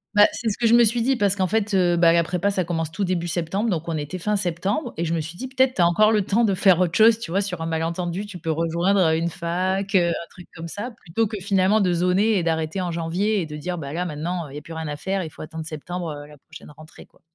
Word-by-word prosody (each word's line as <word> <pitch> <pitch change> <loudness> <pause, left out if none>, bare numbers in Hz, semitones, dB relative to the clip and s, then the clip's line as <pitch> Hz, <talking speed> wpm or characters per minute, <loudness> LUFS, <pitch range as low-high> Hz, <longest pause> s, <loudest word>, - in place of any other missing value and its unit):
Bah, 205 - +8
c'est 230 - -3
ce 200 - -3
que 235 - -1
je 225 - +5
me 240 0 +7
suis 230 +1 +1
dit 265 +1 +2
parce 200 -3 +2
qu'en 190 -2 +1
fait, 215 +2 0
heu, 175 -2 +3
bah 170 -1 +5
la 170 0 +4
prépa, 180 +4 -1
ça 190 -2 0
commence 165 -2 -3
tout 195 +5 -3
début 175 -2 -1
septembre, 175 +6 -1
donc 170 -4 -2
on 165 - -2
était 150 +4 -4
fin 210 +4 -1
septembre 200 - -2
et 170 - -1
je 165 - -1
me 165 - 0
suis 165 +3 -8
dit: 260 - -5
«Peut-être, 260 0 +1
tu 180 - +1
as - - +6
encore 215 +5 +4
le 210 -2 +2
temps 230 +5 +2
de 200 -3 +1
faire 185 -2 +4
autre 180 -2 +1
chose», 225 0 +6
tu 230 - -7
vois? 190 +4 +1
Sur 185 -4 -4
un 165 - -2
malentendu, 170 +4 -2
tu 195 -3 -9
peux 165 0 -5
rejoindre, 170 +5 +1
heu, 160 - +2
une 165 +1 -1
fac, 185 +4 -2
heu, 175 -2 +4
un 170 0 -3
truc 180 -2 -14
comme 165 +1 -7
ça 205 +8 -5
plutôt 225 -1 -2
que 210 0 -5
finalement, 195 +2 +2
de 185 -4 +2
zoner 185 +5 +2
et - - 0
d'arrêter 160 +2 -1
en 180 - -2
janvier 175 +6 0
et - - -3
de 150 -1 -8
dire: 175 +4 -4
«Bah 145 -2 -6
là 180 +2 -2
maintenant, 170 +1 -4
heu, - - -13
il - - -10
y - - -5
a - - -7
plus 165 - -10
rien 160 -1 -5
à 145 - -4
faire, 190 +5 -2
il 160 - -6
faut 155 - -10
attendre 160 0 -7
septembre, 170 +2 -5 0.2
heu, - - -15
la 150 0 -15
prochaine 155 +1 -14
rentrée, 155 +2 -14
quoi» - - -30
180 Hz, 305 wpm, -23 LUFS, 165-200 Hz, 0.2 s, Bah